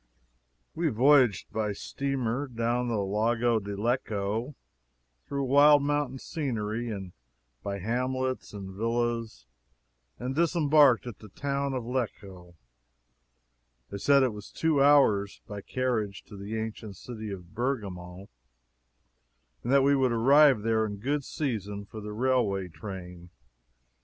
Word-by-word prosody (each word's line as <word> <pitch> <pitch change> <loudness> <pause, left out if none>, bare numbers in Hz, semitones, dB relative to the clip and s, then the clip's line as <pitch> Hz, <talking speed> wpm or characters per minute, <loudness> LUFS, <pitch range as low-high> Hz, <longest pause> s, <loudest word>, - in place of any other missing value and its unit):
We 165 -1 0
voyaged 125 -3 +4
by 105 -2 -1
steamer 135 +3 -2
down 120 0 -1
the 115 - -1
Lago 115 +4 +1
di 100 -1 -6
Lecco, 115 +2 -2 0.7
through 140 -1 -2
wild 145 +2 +6
mountain 145 -2 -1
scenery, 120 -7 -3
and 95 -4 -6 0.5
by 100 0 -4
hamlets 130 +5 -2
and 100 -2 -7
villas, 115 - -2 0.7
and 125 +2 -4
disembarked 150 -5 +4
at 120 -4 -8
the 110 - -12
town 140 +4 -2
of 125 - -3
Lecco. 100 -8 -5 1.4
They 100 - -5
said 140 +4 +4
it 125 -4 +1
was 105 -1 -10
two 160 -3 +1
hours, 135 -9 +4
by 100 -1 -7
carriage 110 -5 -2
to 105 - -13
the 100 +3 -5
ancient 110 -2 -5
city 110 +2 -8
of 90 -2 -9
Bergamo, 100 -7 -4 1.3
and 120 - -3
that 140 -1 +5
we 140 +1 +4
would 130 -2 +2
arrive 135 0 +5
there 110 -1 +2
in 105 -2 -4
good 140 +7 -1
season 105 -9 -4
for 110 +2 -9
the 105 0 -6
railway 105 -5 0
train. 90 -2 -9
115 Hz, 130 wpm, -28 LUFS, 100-135 Hz, 1.4 s, wild